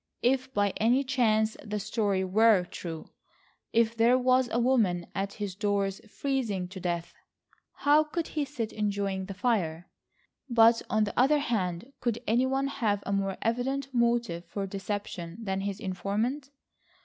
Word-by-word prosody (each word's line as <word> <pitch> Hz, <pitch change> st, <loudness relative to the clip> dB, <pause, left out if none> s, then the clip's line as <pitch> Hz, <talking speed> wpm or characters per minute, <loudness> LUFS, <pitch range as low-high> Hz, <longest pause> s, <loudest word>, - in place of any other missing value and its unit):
If 260 Hz, +1 st, +2 dB
by 205 Hz, -5 st, +1 dB
any 245 Hz, +5 st, +3 dB
chance 220 Hz, -5 st, +2 dB
the 210 Hz, -1 st, -3 dB
story 205 Hz, -2 st, 0 dB
were 205 Hz, +1 st, +4 dB
true,—if 220 Hz, +7 st, -4 dB
there 235 Hz, +2 st, +4 dB
was 255 Hz, 0 st, +3 dB
a -, -, +1 dB
woman 225 Hz, -9 st, +2 dB
at 195 Hz, 0 st, -2 dB
his 205 Hz, -3 st, -4 dB
doors 200 Hz, -1 st, -1 dB
freezing 230 Hz, -9 st, -2 dB
to 190 Hz, 0 st, -8 dB
death, 175 Hz, -2 st, -3 dB, 0.6 s
how 295 Hz, +2 st, +3 dB
could 325 Hz, +2 st, -3 dB
he 300 Hz, -, -1 dB
sit 255 Hz, -6 st, -4 dB
enjoying 200 Hz, -2 st, -1 dB
the 195 Hz, 0 st, -7 dB
fire? 180 Hz, -8 st, -1 dB, 0.6 s
But, 230 Hz, -1 st, +5 dB
on 215 Hz, 0 st, +2 dB
the 205 Hz, -, -2 dB
other 270 Hz, +4 st, +4 dB
hand, 220 Hz, -3 st, -2 dB
could 235 Hz, -3 st, -1 dB
any 240 Hz, +4 st, +2 dB
one 270 Hz, +1 st, 0 dB
have 220 Hz, -7 st, -1 dB
a 200 Hz, -, -1 dB
more 195 Hz, -1 st, -1 dB
evident 265 Hz, +4 st, -1 dB
motive 235 Hz, -7 st, +1 dB
for 195 Hz, +4 st, -4 dB
deception 195 Hz, -3 st, -5 dB
than 195 Hz, -4 st, -2 dB
his 200 Hz, 0 st, -3 dB
informant? 215 Hz, +8 st, -2 dB
215 Hz, 150 wpm, -28 LUFS, 195-250 Hz, 0.6 s, But